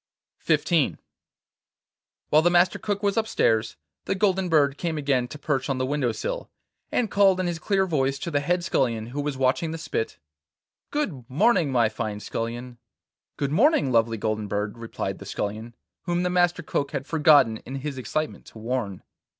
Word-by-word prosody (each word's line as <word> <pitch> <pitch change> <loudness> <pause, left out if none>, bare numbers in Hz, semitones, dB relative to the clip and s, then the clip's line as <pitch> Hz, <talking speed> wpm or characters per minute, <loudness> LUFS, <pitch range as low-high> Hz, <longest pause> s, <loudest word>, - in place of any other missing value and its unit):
XIV - - +2 1.3
While 155 - +6
the 175 - +4
Master 175 +1 +3
Cook 205 -1 -2
was 200 +1 +1
upstairs, 115 - +1 0.3
the - - 0
golden 190 -2 +1
bird 145 -3 +3
came 165 -3 -2
again 140 -4 +1
to 150 - -9
perch 140 -2 -1
on 135 - 0
the 130 - 0
window 135 -3 0
sill, - - -4 0.4
and 230 -4 0
called 195 -2 +4
in 185 - 0
his 170 -2 -2
clear 195 +3 +1
voice 140 -6 0
to 170 - -5
the 145 - +2
head 175 +5 0
scullion, 115 -10 0
who 145 +2 -2
was 145 -2 -3
watching 130 +5 +1
the 165 - -4
spit: 135 -8 -3 0.7
'Good 160 - -3
morning, 165 - +3
my 120 -3 +3
fine 105 -1 -4
Scullion!' 120 +3 -5 0.6
'Good 140 -1 -1
morning, 200 - +3
lovely 115 -1 +2
Golden 110 0 -2
Bird,' 105 +1 -2
replied 115 -1 -5
the - - -9
Scullion, 110 +3 -4 0.3
whom 175 0 0
the 180 - 0
Master 175 -1 +2
Cook 140 -2 -2
had 135 -2 -3
forgotten 150 -8 +5
in 130 - -8
his 135 0 -4
excitement 155 +6 -3
to - - -13
warn. 110 -4 -3
145 Hz, 175 wpm, -25 LUFS, 120-175 Hz, 1.3 s, While